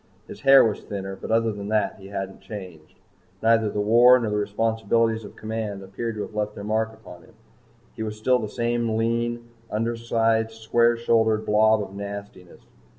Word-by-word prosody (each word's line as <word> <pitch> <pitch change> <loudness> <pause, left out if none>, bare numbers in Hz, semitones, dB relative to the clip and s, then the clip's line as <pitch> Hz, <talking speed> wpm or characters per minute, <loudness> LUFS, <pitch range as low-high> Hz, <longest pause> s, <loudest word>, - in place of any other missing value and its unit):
His - - -10
hair 135 -2 +7
was 110 -2 -1
thinner, 95 -1 -6
but - - -9
other 115 0 +2
than 100 -1 -6
that 105 -2 0
he 95 - -11
hadn't 95 -1 -6
changed. 95 -6 -10 0.5
Neither 115 -1 +3
the 105 - -3
war 120 +4 +6
nor 115 -4 -2
the 105 - 0
responsibilities 110 +1 0
of - - -11
command 110 -3 -5
appeared 110 +4 -5
to 105 - -4
have - - -9
left 105 0 -2
their 100 - -7
mark 110 +1 0
upon 110 -6 -14
him. - - -20 0.6
He - - -7
was 110 -1 -4
still 125 +3 +2
the 110 -2 -4
same 120 -1 -1
lean, 120 +1 -1 0.2
undersized 115 0 0
square 115 +1 +2
shouldered 110 -2 +2
blob 110 0 +3
of 100 - -10
nastiness. 100 -2 -8
110 Hz, 180 wpm, -24 LUFS, 105-115 Hz, 0.6 s, hair